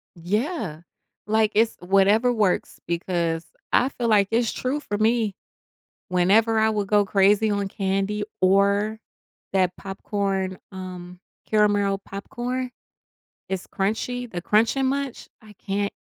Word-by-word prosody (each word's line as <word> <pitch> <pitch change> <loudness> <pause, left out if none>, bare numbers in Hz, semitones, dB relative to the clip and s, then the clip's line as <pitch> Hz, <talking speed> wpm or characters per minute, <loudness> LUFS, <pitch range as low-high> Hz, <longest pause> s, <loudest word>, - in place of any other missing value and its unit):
Yeah, 195 - -2 0.5
like, 220 0 +2
it's 225 +1 +3
whatever 200 +6 +3
works 205 -5 0
because 170 -1 -1 0.3
I 255 - +4
feel 240 -3 -3
like 205 -3 +4
it's 230 0 +2
true 260 +4 -2
for 205 -8 -4
me. 220 -2 +1 0.7
Whenever 205 +5 +3
I 220 0 +4
would 205 -2 -1
go 205 -1 +3
crazy 205 +2 +3
on 200 -1 -1
candy 195 +2 -1 0.2
or 200 +3 +3 0.5
that 185 -2 +2
popcorn, 195 -1 -2
um, 180 -1 -8 0.3
caramel 205 -2 +2
popcorn. 245 +6 -5 0.8
It's 190 -1 -3
crunchy, 235 +5 -2
the 175 - -4
Crunch 220 +5 +3
'n 270 -1 +1
Munch 275 -1 -3
I 215 - -14
can't 200 +1 -2
205 Hz, 125 wpm, -24 LUFS, 190-220 Hz, 0.8 s, I